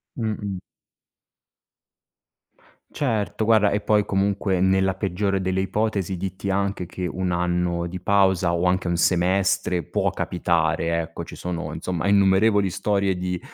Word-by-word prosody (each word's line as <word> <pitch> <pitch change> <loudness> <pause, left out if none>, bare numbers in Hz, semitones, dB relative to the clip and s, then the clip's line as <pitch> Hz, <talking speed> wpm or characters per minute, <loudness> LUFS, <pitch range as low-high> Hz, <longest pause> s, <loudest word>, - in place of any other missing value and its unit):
Mh-mh. 105 -4 -3 2.3
Certo, 110 -6 -1
guarda, 110 -2 +4
e 105 - 0
poi 105 0 +2
comunque, 95 -1 0
nella 95 0 +2
peggiore 100 0 -1
delle 95 0 -1
ipotesi, 100 -2 -1
dirti 95 +2 -4
anche 100 -1 -1
che 90 +1 -5
un 90 +1 -2
anno 90 0 0
di 90 +1 -6
pausa 95 -2 +2
o 85 0 0
anche 90 0 +1
un 85 - 0
semestre 90 +1 +1
può - - 0
capitare, 85 -1 0
ecco, 85 +1 -7
ci - - -10
sono 85 -4 -5
insomma 90 +1 -3
innumerevoli 100 +1 +4
storie 100 0 0
di 90 0 -3
95 Hz, 135 wpm, -23 LUFS, 90-100 Hz, 2.3 s, guarda